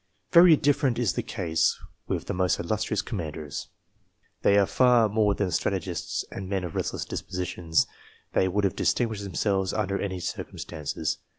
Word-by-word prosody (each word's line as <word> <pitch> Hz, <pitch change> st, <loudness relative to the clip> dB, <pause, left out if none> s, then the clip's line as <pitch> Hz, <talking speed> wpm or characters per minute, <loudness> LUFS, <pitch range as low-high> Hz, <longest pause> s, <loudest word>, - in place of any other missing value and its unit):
Very 170 Hz, -1 st, +8 dB
different 145 Hz, -3 st, +2 dB
is 120 Hz, -5 st, +1 dB
the -, -, -1 dB
case, 85 Hz, -6 st, 0 dB, 0.3 s
with -, -, -2 dB
the -, -, -3 dB
most 90 Hz, -2 st, +1 dB
illustrious 105 Hz, +3 st, -1 dB
commanders. 75 Hz, -6 st, -5 dB, 0.7 s
They 100 Hz, -, +4 dB
are 100 Hz, -, +5 dB
far 125 Hz, 0 st, +4 dB
more 105 Hz, -1 st, +2 dB
than 95 Hz, -3 st, -1 dB
strategists -, -, -2 dB
and 95 Hz, -1 st, -6 dB
men 95 Hz, -2 st, -1 dB
of 85 Hz, -3 st, -5 dB
restless -, -, -2 dB
dispositions; 90 Hz, -3 st, -1 dB, 0.5 s
they 95 Hz, -, +3 dB
would 100 Hz, +3 st, 0 dB
have 100 Hz, 0 st, +1 dB
distinguished 110 Hz, -4 st, 0 dB
themselves 95 Hz, -1 st, 0 dB
under 100 Hz, -2 st, -1 dB
any 95 Hz, -2 st, -3 dB
circumstances. 75 Hz, -3 st, -4 dB
100 Hz, 155 wpm, -27 LUFS, 90-110 Hz, 0.7 s, Very